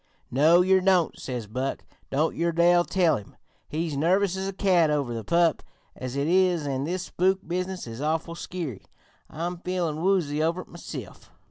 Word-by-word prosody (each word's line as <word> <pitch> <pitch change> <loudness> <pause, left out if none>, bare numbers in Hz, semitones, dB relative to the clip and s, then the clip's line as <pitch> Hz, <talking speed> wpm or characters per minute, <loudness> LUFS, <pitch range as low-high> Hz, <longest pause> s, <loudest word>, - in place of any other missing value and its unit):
"'No, 155 +7 +5
yer 190 +1 +4
don't,' 185 -3 +2
says 125 -4 -4
Buck. 130 +6 -3 0.3
'Don't 150 +4 0
yer 170 +1 +1
dare 175 +1 +4
tell 175 -2 +2
him. 105 - -12 0.3
He's 160 -1 -2
nervous 185 +6 +2
as 190 0 -3
a - - -2
cat 185 -5 +3
over 140 -5 0
the 115 -1 -4
pup 170 +1 +2 0.3
as 130 0 -6
it 140 +1 0
is, 180 -3 +3
an' 135 -1 -2
this 180 +3 -2
spook 190 +1 0
business 185 +2 -3
is 115 +2 -7
awful 160 +2 -1
skeery; 170 - -6 0.4
I'm 170 +3 -4
feelin' 175 -4 -2
woozy 170 -6 +1
over 165 +3 0
it - - -15
meself. 140 - -9
170 Hz, 175 wpm, -26 LUFS, 145-180 Hz, 0.4 s, No